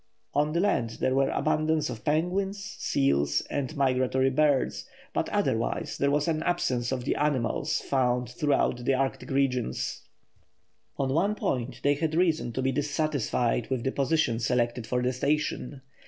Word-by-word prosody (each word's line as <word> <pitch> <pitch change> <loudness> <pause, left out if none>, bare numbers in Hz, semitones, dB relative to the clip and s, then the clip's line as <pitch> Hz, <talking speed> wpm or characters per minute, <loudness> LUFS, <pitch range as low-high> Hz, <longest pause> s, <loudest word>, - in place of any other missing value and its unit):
On 150 +2 +2
the 170 - +1
land 125 - 0
there 130 - +1
were 135 0 +2
abundance 155 +1 +1
of 115 -4 -6
penguins, 190 +6 -1
seals, 70 +1 +1
and 145 +2 -3
migratory 130 0 +2
birds; 145 -1 +1 0.3
but - - -1
otherwise - - -1
there 140 - +3
was 145 +2 +1
an 160 -1 0
absence 130 -9 0
of 125 -2 -2
the - - 0
animals 140 -6 0
found 125 -2 +1
throughout 125 -1 0
the 135 +2 +2
Arctic 135 0 -2
regions. 125 - -1 1.0
On 135 -1 0
one 195 +7 +2
point 125 - -2
they 145 - +4
had 155 +2 -1
reason 165 -7 +1
to 130 - -2
be 135 - +2
dissatisfied 140 -4 0
with 130 -3 -1
the 135 - 0
position 135 -4 +1
selected 120 0 0
for 125 +1 0
the 125 +1 +1
station. 140 0 -1
135 Hz, 155 wpm, -27 LUFS, 125-150 Hz, 1.0 s, they